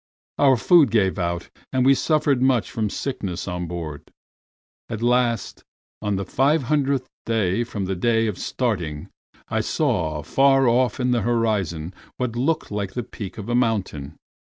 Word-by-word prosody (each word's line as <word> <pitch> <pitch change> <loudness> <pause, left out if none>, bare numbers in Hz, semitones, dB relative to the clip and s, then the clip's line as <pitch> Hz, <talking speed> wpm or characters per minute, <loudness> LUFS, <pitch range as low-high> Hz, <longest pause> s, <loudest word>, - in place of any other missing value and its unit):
Our 135 -3 +5
food 160 +2 +5
gave 100 -4 +1
out, 85 -1 -3 0.2
and 130 -1 +1
we 135 - +7
suffered 145 -2 +1
much 130 -6 +2
from 110 -2 -1
sickness 100 -7 -4
on 90 -1 -3
board. 80 -4 -6 0.8
At 115 -1 -4
last, 120 -2 +1 0.4
on 105 -1 -1
the 95 0 -2
five 140 +3 +2
hundredth 140 -1 0 0.2
day 110 -1 +1
from 105 -5 -4
the 95 +1 -2
day 115 +4 +2
of 105 -5 -3
starting, 90 - -2 0.4
I - - 0
saw 75 -2 -1
far 135 - +4
off 125 +1 +2
on 125 0 +1
the 120 -2 +2
horizon 105 -8 -1 0.2
what 125 -2 -2
looked 155 +4 0
like 100 -2 -3
the 120 - -3
peak 100 -2 -8
of 105 - -7
a 120 - -1
mountain. 100 - -1
115 Hz, 160 wpm, -23 LUFS, 95-130 Hz, 0.8 s, we